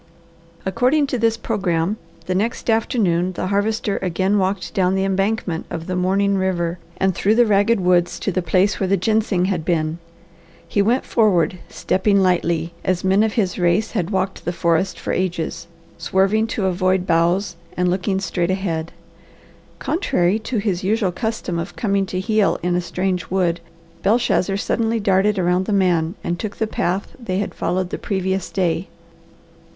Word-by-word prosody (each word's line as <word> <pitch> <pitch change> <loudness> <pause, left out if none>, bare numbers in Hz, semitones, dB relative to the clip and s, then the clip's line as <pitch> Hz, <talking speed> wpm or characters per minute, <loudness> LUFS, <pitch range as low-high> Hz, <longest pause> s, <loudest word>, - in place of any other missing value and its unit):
According 255 +10 +2
to 250 - +1
this 225 0 +2
programme, 190 -4 -1 0.3
the 185 - -1
next 225 +4 0
afternoon 185 -6 +1
the 185 - -3
Harvester 205 0 0
again 190 +3 +1
walked 190 0 -1
down 185 -1 +2
the 190 0 +1
embankment 195 -3 -1
of 165 -1 -5
the 185 - -3
mourning 195 +2 +1
river 175 -2 -1 0.2
and 190 0 +2
through 205 +5 +2
the 240 +1 +5
ragged 210 +1 +3
woods 180 -1 +2
to 200 - 0
the 185 - 0
place 185 +4 +2
where 190 - 0
the 195 +1 +2
ginseng 210 -1 +1
had 185 -4 -1
been. 160 -1 -1 0.7
He 200 - +1
went 235 +6 +1
forward, 180 -6 +2
stepping 200 +1 +1
lightly, 170 -3 +1
as 185 -1 0
men 190 +2 +3
of 220 -1 +1
his 190 -6 0
race 175 +5 +2
had 185 -6 -1
walked 190 -1 -2
the 175 - -1
forest 170 +2 0
for - - -3
ages, 170 -2 -2 0.3
swerving 195 +6 +2
to 220 -3 -2
avoid 185 0 +1
boughs, 175 +2 +1 0.2
and 180 0 +2
looking 190 +2 0
straight 180 -2 -1
ahead. 175 -4 -2 0.9
Contrary 210 - +1
to 230 +2 -3
his 200 -3 -1
usual 205 -1 +1
custom 190 -3 -3
of 170 +3 -5
coming 200 -3 0
to 185 - -3
heel 215 +1 +2
in 175 0 +1
a 180 - +1
strange 180 0 -2
wood, 175 -2 +1 0.4
Belshazzar 200 -3 +2
suddenly 225 +2 0
darted 200 0 +2
around 180 0 +1
the - - -1
man 180 -3 +2
and 175 0 -2
took 215 -2 -4
the 220 - -1
path 195 -2 -2
they 185 -6 -3
had 205 - -2
followed 180 +1 -2
the - - -3
previous 190 -2 -2
day. 180 -1 -1
190 Hz, 170 wpm, -21 LUFS, 175-205 Hz, 0.9 s, the